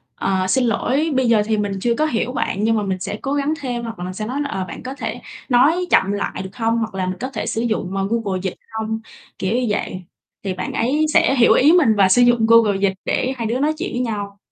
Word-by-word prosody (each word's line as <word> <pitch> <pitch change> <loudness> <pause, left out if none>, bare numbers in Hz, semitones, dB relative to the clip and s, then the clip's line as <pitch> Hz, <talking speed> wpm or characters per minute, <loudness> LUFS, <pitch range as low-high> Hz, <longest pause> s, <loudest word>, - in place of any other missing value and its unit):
"Ờ, 190 -1 0
xin 255 +7 +2
lỗi, 275 +7 0
bây 260 -1 +2
giờ 225 -2 +4
thì 220 0 0
mình 205 -1 -1
chưa 235 +1 +1
có 305 - +1
hiểu 250 -4 -1
bạn 210 -5 -2
nhưng 225 0 +2
mà 210 - 0
mình 190 -2 -2
sẽ 205 - -4
cố 275 - -2
gắng 285 +1 0
thêm." 245 -3 -4
hoặc 230 -4 -7
là 180 - -4
mình 185 - -5
sẽ 215 +3 -4
nói 260 +6 -3
là 285 - -3
"Ờ, 190 -9 -3
bạn - - -9
có 260 - -5
thể - - -5 0.3
nói 295 +9 +4
chậm 195 -8 +3
lại 205 -2 -3
được 190 +1 -10
hông?" 230 0 0
hoặc 220 -3 -3
là 185 - -1
"Mình 185 0 -3
có 255 - -3
thể - - -4
sử 225 - -2
dụng, 215 -5 -2
ờ, 195 0 0
Google 210 -5 -1
Dịch 190 - -3 0.2
hông?" 220 0 -3 0.4
Kiểu 190 +3 -1
như 250 0 +1
vậy, 185 -3 -3 0.4
thì 195 -2 -2
bạn 185 - -5
ấy 280 +7 +1
sẽ 270 - +4
hiểu 240 -3 +5
ý 290 +4 +5
mình 310 -11 +4
và 195 -2 +4
sử 215 +6 +5
dụng 240 -2 +4
Google 225 -3 +5
Dịch 195 -1 +2
để 260 - 0
hai 230 -2 -2
đứa 235 +3 -1
nói 300 +3 +1
chuyện - - -4
với 245 - -2
nhau. 205 -4 -4
225 Hz, 275 wpm, -20 LUFS, 200-255 Hz, 0.4 s, hiểu